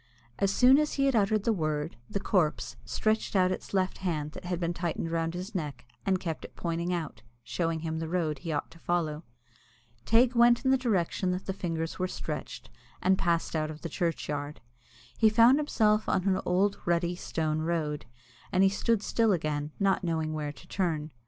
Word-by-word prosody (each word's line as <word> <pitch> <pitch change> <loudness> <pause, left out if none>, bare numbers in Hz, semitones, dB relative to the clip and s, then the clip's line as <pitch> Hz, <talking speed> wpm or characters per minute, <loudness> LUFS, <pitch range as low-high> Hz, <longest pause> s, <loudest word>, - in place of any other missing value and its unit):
As 195 - +3
soon 255 +6 +6
as 300 0 0
he 275 - +1
had 270 -2 +2
uttered 210 -1 +2
the 230 - +2
word, 155 -3 -2
the 200 - -2
corpse 175 -6 0
stretched 215 -1 0
out 185 -1 +4
suddenly - - +2
its - - -15
left 190 -1 0
hand 155 -5 -2
that - - -10
had 175 -1 -2
been 170 0 -1
tightened 170 -1 -3
round 165 0 -1
his 185 +5 -6
neck, 145 -9 -4 0.2
and 190 -1 +2
kept 165 -4 -4
it - - -11
pointing 170 +1 -2
out, 170 -4 -3 0.2
showing 165 -2 -2
him 160 0 -3
the 165 - -3
road 160 -5 -1
he 165 - -4
ought 145 - -2
to 165 - -15
follow. 160 -3 -1 0.8
Teig 235 - +4
went 240 +1 +5
in 260 - +4
the - - +6
direction 195 -6 0
that 180 +1 -2
the 190 - -2
fingers 165 -3 -3
were 185 - +1
stretched, - - -6 0.3
and 190 +1 +3
passed 170 -3 0
out 155 -1 0
of 155 0 -8
the 170 - -3
churchyard. 150 -3 -2 0.6
He 220 - +6
found 230 +6 +6
himself 215 -7 +2
on 185 - +1
an 190 -1 +2
old 195 +3 +2
rutty, 170 0 +1
stony 155 -3 -2
road, 155 -3 -2 0.4
and 185 +1 +4
he 195 - +6
stood 210 +2 0
still 225 -2 +2
again, 150 -4 -1
not 195 -1 +2
knowing 160 -2 -1
where 150 -1 -3
to - - -16
turn. 160 -5 -1
175 Hz, 200 wpm, -29 LUFS, 160-200 Hz, 0.8 s, soon